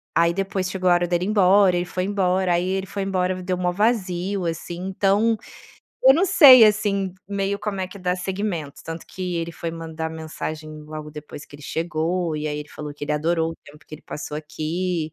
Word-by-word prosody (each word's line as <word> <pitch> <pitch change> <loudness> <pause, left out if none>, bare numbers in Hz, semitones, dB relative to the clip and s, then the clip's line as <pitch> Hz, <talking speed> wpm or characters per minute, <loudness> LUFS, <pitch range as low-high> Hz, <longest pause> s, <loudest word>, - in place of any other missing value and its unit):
aí 170 0 +4
depois 190 0 -2
chegou 185 -1 0
a - - +6
hora 175 0 +2
dele 175 0 +1
ir - - -2
embora, 195 -2 +5
ele 175 - 0
foi 180 +1 -3
embora 190 -2 +1
aí 175 +1 0
ele 190 0 -1
foi 200 +1 -4
embora 185 -1 0
me 185 - -7
deu 180 0 -1
o - - -6
maior 180 -1 +1
vazio, 195 -2 0
assim, 165 +1 -4
então 200 +4 +2 0.7
eu 265 - +10
não 355 +6 +3
sei, 275 -10 +9
assim, 200 -3 +1
meio 200 0 -1
como 210 -2 -3
é 185 - -1
que 185 - -12
dá 180 -1 -1
seguimento, 185 -5 -4
tanto 165 0 -7
que 180 -2 -4
ele 165 0 -3
foi 165 0 -5
mandar 160 -1 -5
mensagem 155 -1 -6
logo 155 0 -8
depois 150 -1 -9
que - - -17
ele 145 - -15
chegou 165 +1 -1
e 150 0 -2
aí 150 0 -3
ele 150 0 -7
falou 150 -1 -7
que 145 - -7
ele 150 - -2
adorou 165 +2 0
o - - -14
tempo 150 +1 -16
que - - -9
ele 155 - -13
passou 150 0 -6
aqui. 155 +2 -3
180 Hz, 220 wpm, -23 LUFS, 160-195 Hz, 0.7 s, eu